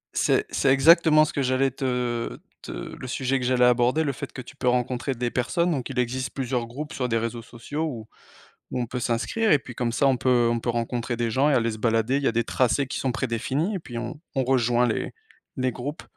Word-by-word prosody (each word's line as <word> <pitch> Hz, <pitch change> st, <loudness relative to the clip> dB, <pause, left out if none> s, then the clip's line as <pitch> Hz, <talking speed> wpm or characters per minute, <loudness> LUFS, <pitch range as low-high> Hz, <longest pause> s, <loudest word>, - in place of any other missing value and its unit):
C'est -, -, +2 dB
c'est -, -, +2 dB
exactement 155 Hz, +2 st, +6 dB
ce -, -, -6 dB
que 140 Hz, -, -1 dB
j'allais 130 Hz, 0 st, +2 dB
te 125 Hz, -3 st, -2 dB, 0.2 s
te -, -, -8 dB
le -, -, -7 dB
sujet 130 Hz, +1 st, 0 dB
que 125 Hz, -, -3 dB
j'allais 125 Hz, 0 st, +3 dB
aborder. 125 Hz, +5 st, +3 dB
Le 145 Hz, -, 0 dB
fait -, -, -7 dB
que 130 Hz, -, -7 dB
tu 125 Hz, -, -13 dB
peux 130 Hz, -, -3 dB
rencontrer 125 Hz, +2 st, 0 dB
des 120 Hz, 0 st, -2 dB
personnes 170 Hz, +8 st, 0 dB
donc 135 Hz, -3 st, -2 dB
il 130 Hz, -, -6 dB
existe 125 Hz, +1 st, -1 dB
plusieurs 125 Hz, -3 st, -2 dB
groupes 145 Hz, +6 st, -7 dB
sur 125 Hz, -4 st, -2 dB
des 115 Hz, -, +1 dB
réseaux 115 Hz, +1 st, -3 dB
sociaux 120 Hz, +7 st, -6 dB
où 115 Hz, -8 st, -5 dB, 0.6 s
où 125 Hz, -, -2 dB
on 120 Hz, -, -1 dB
peut 125 Hz, +2 st, -4 dB
s'inscrire 125 Hz, -, 0 dB
et 145 Hz, -, +5 dB
puis, 125 Hz, -, -10 dB
comme 120 Hz, -2 st, -1 dB
ça 140 Hz, -, +2 dB
on 135 Hz, -2 st, +4 dB
peut 125 Hz, -2 st, +3 dB
on 115 Hz, -, -1 dB
peut 120 Hz, -, -1 dB
rencontrer 120 Hz, +1 st, -2 dB
des 115 Hz, -1 st, -1 dB
gens 135 Hz, +6 st, +2 dB
et 150 Hz, -, +3 dB
aller 115 Hz, -2 st, +2 dB
se 110 Hz, -, -6 dB
balader. 115 Hz, +3 st, +1 dB
Il -, -, -4 dB
y -, -, +4 dB
a -, -, 0 dB
des 115 Hz, +1 st, +1 dB
tracés 130 Hz, +4 st, +1 dB
qui -, -, -4 dB
sont 130 Hz, -, -1 dB
prédéfinis 130 Hz, -, -1 dB
et -, -, -2 dB
puis, 125 Hz, -8 st, -9 dB
on 120 Hz, +5 st, -6 dB
on 135 Hz, -2 st, +1 dB
rejoint 125 Hz, -1 st, +2 dB
les 115 Hz, -, -2 dB, 0.4 s
les 130 Hz, -1 st, 0 dB
groupes. 140 Hz, +7 st, -6 dB
125 Hz, 245 wpm, -25 LUFS, 120-135 Hz, 0.6 s, exactement